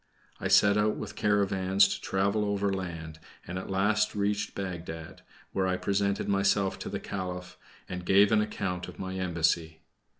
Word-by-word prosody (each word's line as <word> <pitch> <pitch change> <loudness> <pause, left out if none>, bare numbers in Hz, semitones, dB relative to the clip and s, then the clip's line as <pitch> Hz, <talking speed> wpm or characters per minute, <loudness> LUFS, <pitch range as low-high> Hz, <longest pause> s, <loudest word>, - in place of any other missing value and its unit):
I - - -2
set 100 0 +5
out 105 0 +2
with 105 0 -6
caravans 100 -2 +3
to - - -4
travel 100 +2 +1
overland, 95 -6 -2 0.3
and 90 +1 -4
at 95 - -8
last 105 +3 +1
reached 105 0 -1
Bagdad, 85 -4 -6 0.3
where 95 -1 0
I 90 0 0
presented 100 +2 0
myself 100 -1 +2
to - - -5
the - - -3
Caliph, 90 -2 -5 0.3
and 90 -1 -5
gave 100 +3 +5
an 110 -1 +5
account 90 -4 -3
of - - -10
my 95 -1 -5
embassy. 85 -2 0
95 Hz, 160 wpm, -29 LUFS, 90-100 Hz, 0.3 s, set